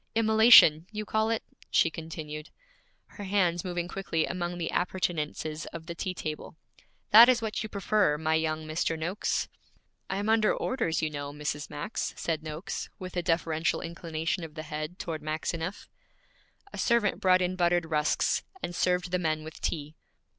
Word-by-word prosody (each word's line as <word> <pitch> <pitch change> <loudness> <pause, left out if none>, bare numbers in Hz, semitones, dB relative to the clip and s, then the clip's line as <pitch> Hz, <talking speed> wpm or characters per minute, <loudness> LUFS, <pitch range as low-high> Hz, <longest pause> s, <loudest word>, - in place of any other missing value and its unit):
Immolation, 220 -7 +7
you 215 0 -4
call 220 +1 +1
it?' 225 -1 -1 0.3
she 165 - +3
continued, 155 -1 -7 0.6
her 205 - -10
hands 180 -3 +1
moving 175 -1 -3
quickly 175 -4 -1
among 175 -1 -3
the 170 -2 -3
appurtenances 160 -3 -2
of 165 -1 -8
the 170 - -5
tea 185 +2 -4
table. 155 0 -6 0.5
'That 230 +4 +10
is 250 -2 +4
what 220 -2 -3
you 215 - -5
prefer, 200 -6 +1
my 160 +1 0
young 160 0 0
Mr. 160 +1 -1
Noakes.' 175 +6 -1 0.6
'I - - -1
am 205 +1 -2
under 220 -1 +3
orders, 225 -12 -1
you 155 - 0
know, 145 -1 -5
Mrs. 150 0 -4
Max,' 150 +10 -4
said 160 -2 -2
Noakes, 155 +3 -5
with 185 -1 -8
a 175 - +1
deferential 165 -2 0
inclination 165 +1 -3
of 160 -1 -9
the 155 - -5
head 155 +3 -5
toward 160 -3 -4
Maxineff. 160 +4 -4 0.9
A - - -6
servant 235 -3 +2
brought 185 -1 +4
in 180 +1 -1
buttered 175 -1 +2
rusks, 155 -1 +1 0.2
and 175 - -3
served 180 0 +1
the 180 - +1
men 155 -2 -1
with 160 0 -10
tea. 150 -2 -3
170 Hz, 170 wpm, -28 LUFS, 155-185 Hz, 0.9 s, That